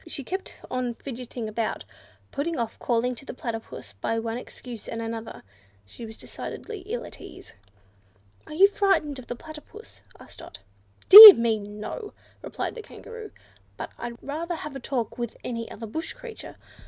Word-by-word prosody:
She 285 -4 -6
kept 380 +7 -6 0.2
on 250 -2 -2
fidgeting 245 -3 -7
about, 215 +1 -3 0.5
putting 315 +4 -3
off 230 -2 -4
calling 245 +1 0
to 245 - -11
the 265 - -9
Platypus 225 - -7
by 105 - -3
one 225 0 -3
excuse 245 -3 -10
and 230 - -5
another: 225 0 -6 0.4
she 225 - -10
was 220 - -11
decidedly 435 -3 -8
ill 475 +3 -4
at - - -13
ease. - - -13 0.9
"Are - - -9
you 385 +5 +7
frightened 390 -9 0
of 250 - -12
the 245 - -5
Platypus?" 315 - -13 0.2
asked - - -13
Dot. - - -11 0.5
"Dear 420 +1 +15
me, 230 -2 0
no!" 210 - -8 0.3
replied - - -5
the 465 - -8
Kangaroo, 455 0 -11 0.5
"but - - -7
I'd 235 0 -6
rather 330 +5 -4
have 300 -3 -8
a - - -5
talk 245 -2 -4
with 235 -2 -5
any 230 -2 -5
other 225 - -8
bush 320 +10 -6
creature. - - -11
250 Hz, 165 wpm, -25 LUFS, 230-335 Hz, 0.9 s, Dear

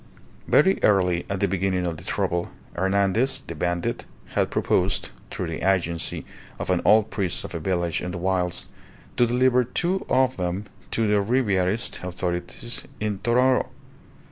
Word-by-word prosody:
Very 190 +6 +4
early, 90 -4 +3
at 100 0 -2
the 100 - +3
beginning 95 -1 0
of 85 -2 -2
the 85 - -10
trouble, 90 -3 -1 0.2
Hernandez, 100 +7 +1
the - - -6
bandit, 85 +2 -2 0.3
had - - +1
proposed 95 +2 0 0.2
(through - - -3
the - - -4
agency 85 -3 0 0.3
of - - -2
an 90 - +2
old 110 +1 +5
priest 95 -2 -1
of - - -7
a 85 - -3
village 85 -1 -1
in 90 - -4
the 90 - -4
wilds) 90 -1 0 0.5
to 120 - +5
deliver 125 +1 +3
two 175 +10 -1
of 130 0 +3
them 90 +2 -2 0.2
to 115 - 0
the 105 -1 +3
Ribierist 100 -4 0
authorities 90 +5 -3 0.2
in 105 -2 -2
Tonoro. 125 +3 +3
95 Hz, 155 wpm, -24 LUFS, 90-115 Hz, 0.5 s, old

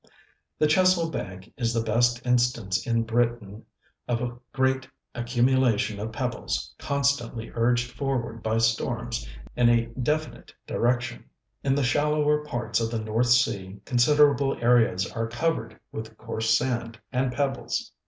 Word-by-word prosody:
The - - +3
Chesil 170 +1 +3
Bank 95 -4 -6
is 115 -2 -1
the 115 - +1
best 120 +2 +1
instance 120 -6 +1
in 115 -1 +2
Britain 115 -2 -1 0.4
of 120 -1 0
a 120 -1 -3 0.2
great 130 0 +1 0.3
accumulation 120 -3 +1
of 110 +2 -4
pebbles - - -3
constantly 140 -5 -1
urged 120 +1 +1
forward 120 -5 -3
by 110 0 0
storms 115 - -1 0.3
in 120 -1 +4
a 120 -1 +3
definite 150 +6 -3
direction. 120 +1 -1 0.4
In 135 -1 +2
the 145 - +1
shallower 150 +2 +2
parts 120 -6 -2
of 115 -1 -1
the 115 -1 -2
North 110 +3 0
Sea 100 -5 +2
considerable 140 +2 +3
areas 115 -6 +3
are 115 0 -2
covered 115 -2 -2
with 110 0 -7
coarse 110 -1 +1
sand 120 -3 -3
and 130 0 0
pebbles. 135 0 -2
120 Hz, 135 wpm, -26 LUFS, 115-130 Hz, 0.4 s, in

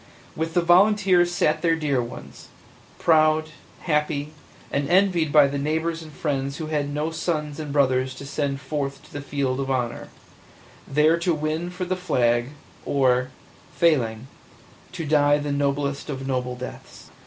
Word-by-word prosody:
With 160 +1 -3
the 175 - +3
volunteers 185 0 +4
sat 175 -4 +1
their 165 -1 +3
dear 145 -5 0
ones, 120 - -9 0.5
proud, 155 -1 +3 0.3
happy, 150 -1 -1 0.4
and 140 +1 -1
envied 175 -4 +3
by 150 -1 +7
the 140 0 -2
neighbors 160 +3 -1
and 155 -1 -11
friends 140 -2 -2
who 160 - -4
had 150 -2 -2
no 150 +3 -2
sons 155 -3 -3
and 150 -2 -5
brothers 130 -2 +1
to 140 - -9
send 140 -1 -2
forth 140 0 -4
to 155 - -18
the 145 - -5
field 140 -2 -2
of 135 0 -3
honor, 125 -3 -2 0.8
there 155 +4 +3
to 170 -1 +1
win 155 +3 -2
for 180 +1 -5
the 185 +1 -1
flag, 120 -9 +1 0.4
or, 130 -2 +2 0.5
failing, 125 -9 +1 0.7
die 150 -4 +2
the 145 0 -3
noblest 140 0 -1
of 135 -2 -4
noble 125 -1 -2
deaths. 125 +1 -10
150 Hz, 155 wpm, -24 LUFS, 140-160 Hz, 0.8 s, by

